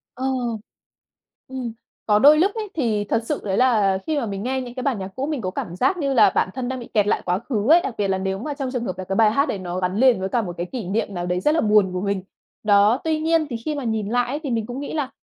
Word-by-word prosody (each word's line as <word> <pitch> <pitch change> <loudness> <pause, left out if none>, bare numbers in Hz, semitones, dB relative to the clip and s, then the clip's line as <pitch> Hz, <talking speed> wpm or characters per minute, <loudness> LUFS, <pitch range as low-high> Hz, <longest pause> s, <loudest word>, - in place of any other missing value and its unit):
Ờ. 260 - -4 1.2
Ừm, 255 -3 -5 0.3
có 210 -1 +4
đôi 295 +5 +7
lúc 375 +5 +4
ấy, 435 -2 -4
thì 225 -9 0
thật 230 - +1
sự - - -2
đấy 195 -1 -1
là 215 -7 +3
khi 315 - 0
mà 240 - -1
mình 200 -1 -4
nghe 260 +3 -1
những 245 -1 -7
cái 255 - -5
bản 255 -4 0
nhạc 190 -1 -5
cũ, 265 +2 -2
mình 300 -3 -2
có 185 -4 -3
cảm 175 -1 -5
giác 265 - +2
như 275 -4 0
là 230 - +6
bản - - +2
thân 255 -1 -3
đang 260 -1 -4
bị 235 - -9
kẹt 210 -2 +3
lại - - +1
quá 180 +1 0
khứ 225 0 -2
ấy. 335 +3 +7
Đặc 260 - -4
biệt 205 -1 0
là 190 0 +1
nếu 190 0 -2
mà 290 +7 -4
trong 275 -2 -4
trường 250 -2 -3
hợp 185 -4 -4
là 185 - -4
cái 195 +1 -3
bài 215 -1 +5
hát 280 +6 +1
đấy 200 - -2
nó 180 0 -4
gắn 180 +1 -1
liền 250 -3 +4
với 190 - -2
cả 235 +4 0
một 175 -4 -5
cái 175 - -2
kỷ 250 -5 -4
niệm 205 0 -1
nào 175 -1 -3
đấy 180 0 -1
rất 300 +11 +2
là 325 - +3
buồn 210 -3 +3
của 180 - -2
mình. 200 -1 -1 0.4
Đó, 210 +4 +4
tuy 315 -1 0
nhiên 325 0 +2
thì 235 - -2
khi 305 - -1
mà 280 - -4
nhìn 220 -3 -1
lại 245 +2 +1
ấy, 285 +4 -3
thì 285 - -4
mình 225 -2 -1
cũng 245 +3 -6
nghĩ 285 - -5
là 290 -4 -2
230 Hz, 305 wpm, -22 LUFS, 195-270 Hz, 1.2 s, đôi